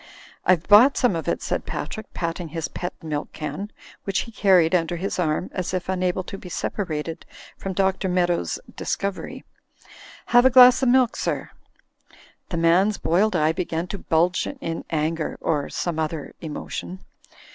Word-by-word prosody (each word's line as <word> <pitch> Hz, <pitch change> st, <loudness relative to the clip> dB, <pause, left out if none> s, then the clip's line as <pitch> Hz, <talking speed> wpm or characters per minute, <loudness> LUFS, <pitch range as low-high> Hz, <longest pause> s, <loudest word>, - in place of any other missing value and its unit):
"I've 180 Hz, -2 st, +3 dB
bought 235 Hz, +7 st, +7 dB
some 245 Hz, -8 st, +2 dB
of 165 Hz, -, -4 dB
it," -, -, -1 dB
said -, -, -2 dB
Patrick, 220 Hz, -2 st, -5 dB
patting 170 Hz, 0 st, -3 dB
his 160 Hz, 0 st, -4 dB
pet 180 Hz, -, -5 dB
milk 150 Hz, -2 st, -4 dB
can, 155 Hz, +7 st, -5 dB, 0.3 s
which 195 Hz, -1 st, 0 dB
he 230 Hz, -, -8 dB
carried 185 Hz, -6 st, +4 dB
under 175 Hz, -1 st, +1 dB
his 185 Hz, +2 st, -3 dB
arm, 160 Hz, +1 st, -1 dB
as 185 Hz, 0 st, -2 dB
if 180 Hz, -, -2 dB
tmable 185 Hz, 0 st, -1 dB
to 195 Hz, -, -7 dB
be 180 Hz, -, -10 dB
separated 165 Hz, -3 st, -3 dB, 0.3 s
from 195 Hz, -, -5 dB
Dr. 190 Hz, 0 st, 0 dB
Meadows's 175 Hz, -, 0 dB, 0.2 s
discovery. 200 Hz, -1 st, -4 dB, 0.8 s
"Have 245 Hz, 0 st, +5 dB
a 260 Hz, -, +7 dB
glass 255 Hz, 0 st, +8 dB
of 260 Hz, -, +3 dB
milk, 250 Hz, -1 st, +4 dB
sir." -, -, -3 dB, 1.0 s
The 170 Hz, -, -3 dB
man's 180 Hz, +5 st, +3 dB
boiled 190 Hz, +4 st, +1 dB
eye 155 Hz, -1 st, +3 dB
began 170 Hz, -1 st, -2 dB
to 200 Hz, -, -5 dB
bulge 175 Hz, +3 st, +1 dB
in 165 Hz, -, -5 dB
anger— 160 Hz, 0 st, -1 dB
or 150 Hz, -3 st, -1 dB
some 170 Hz, -3 st, -3 dB
other 155 Hz, -1 st, -3 dB
emotion. 170 Hz, +3 st, -6 dB
180 Hz, 160 wpm, -23 LUFS, 165-195 Hz, 1.0 s, glass